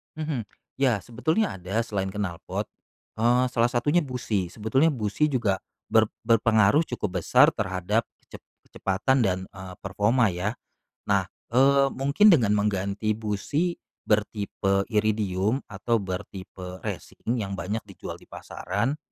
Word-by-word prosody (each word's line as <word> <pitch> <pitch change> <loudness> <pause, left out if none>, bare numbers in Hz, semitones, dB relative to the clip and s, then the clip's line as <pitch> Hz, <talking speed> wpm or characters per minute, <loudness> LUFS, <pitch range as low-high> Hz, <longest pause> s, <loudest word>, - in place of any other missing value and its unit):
Mhm, 150 -7 -3 0.3
Ya 125 -7 +2
sebetulnya 155 - -1
ada 95 +5 -1
selain 100 -4 -2
knalpot, 95 -5 -4 0.5
eee, 120 +3 +3
salah 115 -2 +2
satunya 120 +6 +1
busi, 120 -7 -2
sebetulnya 110 - +1
busi 110 +4 0
juga 120 -10 +1 0.3
ber 110 0 +5 0.2
berpengaruh 115 +5 +4
cukup 105 -6 -3
besar - - +6
terhadap 95 +3 -1 0.2
kecep - - -12 0.3
kecepatan 100 +8 0
dan, 95 -1 +1
eee, 95 -2 -9
performa 105 +4 +2
ya. 95 +4 -2 0.5
Nah, 100 -2 +1 0.2
eee, 135 +1 +4
mungkin 140 +10 +3
dengan 140 - +6
mengganti 100 +1 0
busi 110 - -2 0.2
bertipe 100 -2 0
iridium 105 +1 +1
atau 105 +3 0
bertipe 95 -1 -7
racing 120 +2 -4
yang 100 -3 -3
banyak 105 +3 -3
dijual - - -8
di - - -19
pasaran, 115 - -3
110 Hz, 125 wpm, -26 LUFS, 100-125 Hz, 0.5 s, besar